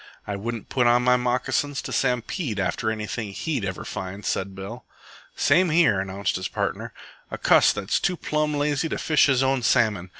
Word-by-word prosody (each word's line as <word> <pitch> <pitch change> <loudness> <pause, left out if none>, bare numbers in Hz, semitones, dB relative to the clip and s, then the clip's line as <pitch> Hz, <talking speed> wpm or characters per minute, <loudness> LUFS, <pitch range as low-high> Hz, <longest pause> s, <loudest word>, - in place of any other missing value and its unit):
"I 100 - -3
wouldn't 115 +2 -5
put 125 -3 +2
on 120 +1 +4
my 125 0 +4
moccasins 125 +3 -1
to - - -6
stampede 125 - -1
after 95 +3 -1
anything 110 -1 -4
he'd 140 -1 -2
ever 95 -1 -4
find," 95 +2 -6
said 95 0 -2
Bill. 95 0 -8 0.5
"Same 175 +5 +3
here," 155 - +4
announced 95 0 -2
his 95 - -3
partner. - - -3 0.4
"A - - -5
cuss - - +5
that's 105 0 -1
too 180 -2 0
plumb 150 -1 -1
lazy 145 +2 0
to - - -2
fish 150 -1 +3
his 135 -1 +3
own 135 -1 +1
salmon. 110 -7 +2
120 Hz, 180 wpm, -24 LUFS, 100-140 Hz, 0.5 s, cuss